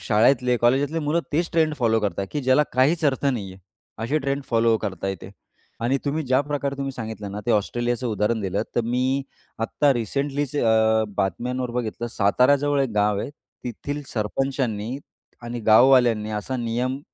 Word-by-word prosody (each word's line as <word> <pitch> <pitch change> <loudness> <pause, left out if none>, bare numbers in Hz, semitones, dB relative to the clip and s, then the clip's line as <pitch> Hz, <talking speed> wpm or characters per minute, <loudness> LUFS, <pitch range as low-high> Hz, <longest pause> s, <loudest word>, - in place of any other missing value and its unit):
शाळेतले, 125 +3 +3
कॉलेजातले 135 +7 +2
मुलं 155 +3 +1
तेच 165 +3 +1
ट्रेंड 160 -2 +2
फॉलो 115 -4 +1
करतात, 100 -1 -2
की 150 - -2
ज्याला 130 +2 +4
काहीच 145 +6 +2
अर्थ 140 -1 +1
नाहीये. 100 -9 -2 0.4
अशी 120 +7 0
ट्रेंड 140 0 -2
फॉलो 115 -1 +3
करताय 95 0 -3
ते. - - -9 0.5
आणि 120 +4 +1
तुम्ही 150 +2 -1
ज्या 130 +1 +3
प्रकारे 140 -1 -3
तुम्ही 135 0 -3
सांगितलं 110 -4 -6
ना, 105 - -5
ते - - +1
ऑस्ट्रेलियाचं 120 +3 0
उदाहरण 110 0 0
दिलं, 100 +1 -1
तर - - +4
मी 130 +3 0 0.4
आत्ता 140 +5 +2
रिसेंटलीच 140 +4 -2
अ, 110 -3 +3
बातम्यांवर 125 +6 -1
बघितलं. 115 0 -3
साताऱ्याजवळ 140 +7 +3
एक 130 - -2
गाव 105 -1 +2
आहे - - -5 0.3
तिथील 145 +4 -5
सरपंचांनी 120 +1 -2 0.4
आणि 120 0 -5
गाववाल्यांनी 120 -2 +5
असा 130 +5 -4
नियम 125 +3 -2
125 Hz, 160 wpm, -23 LUFS, 110-140 Hz, 0.5 s, गाववाल्यांनी